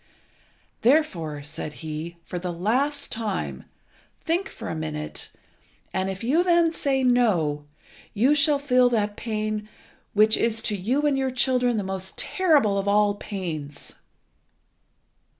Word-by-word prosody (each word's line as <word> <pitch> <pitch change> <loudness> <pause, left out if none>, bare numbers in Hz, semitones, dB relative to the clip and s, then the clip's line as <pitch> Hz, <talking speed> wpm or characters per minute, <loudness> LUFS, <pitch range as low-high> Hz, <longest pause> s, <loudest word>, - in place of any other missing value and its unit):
"Therefore," 175 - +1
said 150 +1 -5
he, 160 +2 -5
"for 180 - -5
the 180 0 -3
last 250 +12 -1
time, 220 -4 -3 0.5
think 350 +4 -1
for - - -8
a - - -3
minute, 155 -1 -5 0.6
and 190 0 0
if 190 +2 -5
you 295 +9 +3
then 340 -2 +3
say 270 -4 0
'No,' 185 -13 +2 0.5
you 250 +8 +4
shall 295 0 +4
feel 255 -3 +3
that 210 -3 0
pain 215 -1 -3 0.4
which 215 +1 +5
is 225 -1 +1
to 210 - 0
you 245 +10 0
and 280 -2 +2
your 265 0 0
children 250 -2 +2
the 205 - -1
most 190 0 -5
terrible 290 - +2
of 195 - -3
all 205 0 +4
pains." 165 -8 -6
215 Hz, 135 wpm, -25 LUFS, 185-265 Hz, 0.6 s, which